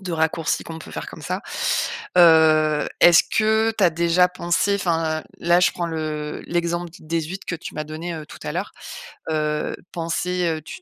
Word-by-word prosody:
de 180 -2 -4
raccourcis 160 -1 0
qu'on 165 -1 -7
peut - - -11
faire - - -6
comme - - -10
ça. - - -3 0.8
Heu, 155 -2 +5
est-ce 175 -1 +8
que 220 +1 +2
tu 205 - +3
as 175 - +5
déjà 170 +2 +3
pensé 180 +2 0
enfin, 165 -4 -1 0.2
là 175 +1 +4
je 180 - +4
prends 175 - -3
le 155 -2 -4
l'exemple 170 0 -1
des 165 +1 -2
huitres 180 +5 -7
que - - -2
tu 165 - -9
m'as 155 - -3
donné, 160 +3 -6
heu, 155 -1 -7
tout - - -12
à - - -3
l'heure, - - -4 0.6
heu, 150 -1 -1 0.2
penser, 175 +1 -1
heu, 160 -1 -1
tu, 165 - -10
165 Hz, 190 wpm, -22 LUFS, 155-175 Hz, 0.8 s, est-ce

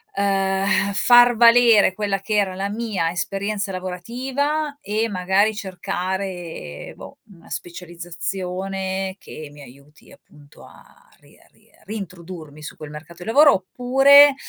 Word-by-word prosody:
uhm, 195 -1 0 0.3
far 240 +3 +6
valere 230 -3 +6
quella 200 -1 -2
che 215 +2 -2
era 195 -3 +1
la 195 +1 -3
mia 205 -6 -2
esperienza 200 +3 -3
lavorativa 260 - -3
e 220 -2 -1
magari 195 +2 +1
cercare, 185 - -5
boh, - - -12
una 175 -4 -18
specializzazione 185 +2 -5
che 155 -2 -10
mi 145 0 -14
aiuti, 140 +3 -17
appunto, 145 -1 -19
a - - -19
ri - - -22
a - - -24
ri - - -29
a - - -26
rintrodurmi 175 -7 -9
su 150 - -9
quel 155 - -9
mercato 160 +4 -11
di 185 - -6
lavoro 285 +5 +7
oppure, 270 +8 +5
195 Hz, 135 wpm, -21 LUFS, 175-220 Hz, 0.3 s, lavoro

